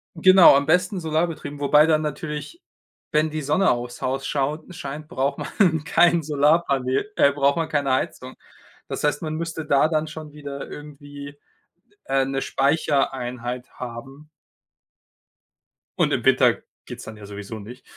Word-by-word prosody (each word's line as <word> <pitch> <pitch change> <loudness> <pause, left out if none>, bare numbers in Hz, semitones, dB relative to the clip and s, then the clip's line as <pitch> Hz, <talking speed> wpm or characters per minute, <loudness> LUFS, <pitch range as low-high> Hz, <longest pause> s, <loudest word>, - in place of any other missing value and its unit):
genau, 185 -1 +7
am 140 +1 +2
besten 180 +5 +1
solarbetrieben, 160 -3 -2
wobei 150 +1 +5
dann 155 -1 +2
natürlich, 150 - -5 0.5
wenn 155 +1 +2
die 155 0 -4
Sonne 150 +7 +2
aufs 120 0 -4
Haus 135 +1 -2
schaut 150 +5 -2
scheint, 150 +1 -7
braucht 140 -4 -1 0.2
man 165 -6 +3
kein 170 +2 +3
Solarpaneel 145 +1 +1
äh, 140 - +4
braucht 140 +1 +1
man 165 -1 -1
keine 145 -3 0
Heizung. 130 0 -3 0.5
Das - - -5
heißt, 145 -1 +1
man 155 -2 -4
müsste 160 -1 -4
da 140 0 +3
dann 155 -1 -1
schon 155 -1 -9
wieder 140 -2 -7
irgendwie, 145 -1 -10 0.7
äh, 135 0 +1
'ne 135 0 -2
Speichereinheit 130 -4 -1
haben. 135 +5 -9 1.7
Und - - +2
im - - -1
Winter - - +4 0.2
geht's - - -9
dann 110 - -9
ja 105 - -11
sowieso 105 +2 -8
nicht. 120 +6 -11
145 Hz, 145 wpm, -23 LUFS, 135-155 Hz, 1.7 s, genau